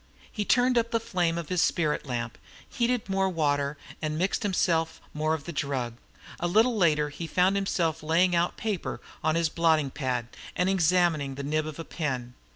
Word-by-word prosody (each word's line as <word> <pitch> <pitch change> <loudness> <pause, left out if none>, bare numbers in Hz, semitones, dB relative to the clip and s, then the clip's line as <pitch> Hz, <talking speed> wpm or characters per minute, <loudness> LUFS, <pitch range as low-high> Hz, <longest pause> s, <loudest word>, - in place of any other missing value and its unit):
He 210 - -3
turned 245 +1 +4
up 230 0 -1
the 230 - +1
flame 175 -6 0
of 170 -2 -5
his 180 -2 +2
spirit 150 -3 +1
lamp, 120 -2 -3 0.3
heated 240 -1 0
more 195 0 +1
water, 145 -4 0 0.2
and 155 -1 -2
mixed 185 +4 0
himself 170 -5 +1
more 155 +1 +1
of 150 - -7
the 170 - -6
drug. 130 -5 -2 0.4
A 175 - 0
little 225 +7 +4
later 155 -6 +3
he 155 +3 -6
found 185 +3 +3
himself 175 -5 0
laying 170 +3 +3
out 170 +1 +1
paper 210 -5 -3 0.2
on 155 0 +2
his 165 -1 +2
blotting 155 -3 +2
pad, 125 -4 -2 0.3
and 180 +1 +2
examining 170 -6 +2
the 140 - -5
nib 155 +2 0
of 155 - -7
a 165 - -6
pen. 130 -6 -3
165 Hz, 185 wpm, -27 LUFS, 150-185 Hz, 0.4 s, turned